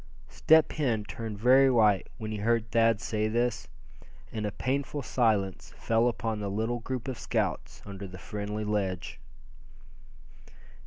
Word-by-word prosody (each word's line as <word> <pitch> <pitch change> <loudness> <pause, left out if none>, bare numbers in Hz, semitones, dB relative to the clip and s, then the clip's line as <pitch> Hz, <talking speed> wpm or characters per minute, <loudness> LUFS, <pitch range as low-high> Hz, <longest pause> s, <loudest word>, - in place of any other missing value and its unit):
Step 160 0 +4
Hen 120 -8 0
turned 110 0 -6
very 130 +5 +5
white 105 -6 +3
when 110 -2 -5
he 110 - -3
heard 115 +1 0
Thad 115 -2 +3
say 110 -1 -1
this, 115 -7 -1 0.6
and 105 -1 -3
a - - -3
painful 140 +5 -2
silence 105 -7 0
fell 115 +1 +2
upon 115 -2 -2
the 100 -1 -3
little 110 +4 -1
group 125 +1 -5
of 130 -3 -4
scouts - - -2
under 100 -1 -7
the 95 0 -10
friendly 105 +3 -5
ledge. 100 -4 -2
110 Hz, 145 wpm, -29 LUFS, 105-120 Hz, 0.6 s, very